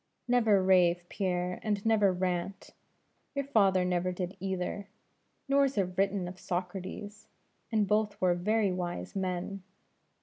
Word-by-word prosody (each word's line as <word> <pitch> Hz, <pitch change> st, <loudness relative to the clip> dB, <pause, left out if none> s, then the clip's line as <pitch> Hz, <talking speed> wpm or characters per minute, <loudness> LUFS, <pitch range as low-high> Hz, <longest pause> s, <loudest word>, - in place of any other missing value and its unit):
"Never 225 Hz, -6 st, +4 dB
rave, 180 Hz, -2 st, +4 dB
Pierre; 180 Hz, -2 st, -2 dB
and 205 Hz, -1 st, -2 dB
never 210 Hz, -3 st, +4 dB
rant. 180 Hz, +1 st, -3 dB, 0.6 s
Your 280 Hz, -1 st, -1 dB
father 195 Hz, -8 st, +3 dB
never 180 Hz, 0 st, 0 dB
did 180 Hz, +1 st, -4 dB
either; 190 Hz, +1 st, -3 dB, 0.6 s
nor 275 Hz, 0 st, +4 dB
is 270 Hz, -4 st, -3 dB
it 185 Hz, -2 st, 0 dB
written 195 Hz, -1 st, +1 dB
of 180 Hz, +1 st, -9 dB
Socrates; 185 Hz, +3 st, -5 dB, 0.4 s
and 215 Hz, -2 st, +2 dB
both 210 Hz, 0 st, +1 dB
were 180 Hz, -1 st, +3 dB
very 205 Hz, +3 st, +1 dB
wise 180 Hz, 0 st, -4 dB
men. 190 Hz, +1 st, -3 dB
190 Hz, 135 wpm, -30 LUFS, 180-205 Hz, 0.6 s, Never